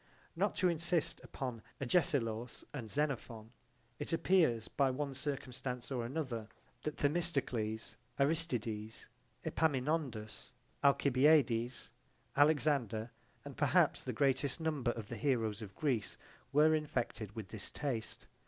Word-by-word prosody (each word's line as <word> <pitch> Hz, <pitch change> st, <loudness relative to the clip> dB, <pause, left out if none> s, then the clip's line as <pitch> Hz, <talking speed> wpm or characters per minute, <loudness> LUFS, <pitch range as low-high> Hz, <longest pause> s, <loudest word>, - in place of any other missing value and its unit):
Not -, -, +1 dB
to 185 Hz, -, +3 dB
insist 170 Hz, -1 st, 0 dB
upon 125 Hz, -5 st, -5 dB, 0.2 s
Agesilaus 120 Hz, -5 st, 0 dB
and 120 Hz, -7 st, -5 dB
Xenophon, 120 Hz, -6 st, -2 dB, 0.5 s
it -, -, -2 dB
appears 165 Hz, -, +3 dB
by 140 Hz, -1 st, +2 dB
one 140 Hz, +1 st, -2 dB
circumstance 130 Hz, -2 st, -4 dB
or 125 Hz, -3 st, -1 dB
another 120 Hz, -4 st, -3 dB, 0.3 s
that 150 Hz, -, -4 dB
Themistocles, 140 Hz, -9 st, 0 dB, 0.2 s
Aristides, 125 Hz, -8 st, -1 dB, 0.4 s
Epaminondus, 135 Hz, -7 st, -1 dB, 0.3 s
Alcibiades, 135 Hz, -3 st, +4 dB, 0.4 s
Alexander 140 Hz, -7 st, +3 dB, 0.3 s
and -, -, -8 dB
perhaps -, -, +3 dB
the -, -, -2 dB
greatest 140 Hz, +1 st, +1 dB
number 155 Hz, -6 st, 0 dB
of 115 Hz, -3 st, -3 dB
the -, -, -5 dB
heroes 115 Hz, -6 st, 0 dB
of 100 Hz, -3 st, -8 dB
Greece 125 Hz, -9 st, -1 dB, 0.3 s
were 150 Hz, +2 st, +5 dB
infected 120 Hz, -8 st, -2 dB
with 110 Hz, -4 st, -6 dB
this 110 Hz, -2 st, -1 dB
taste. 125 Hz, -7 st, -3 dB
130 Hz, 115 wpm, -35 LUFS, 115-150 Hz, 0.5 s, were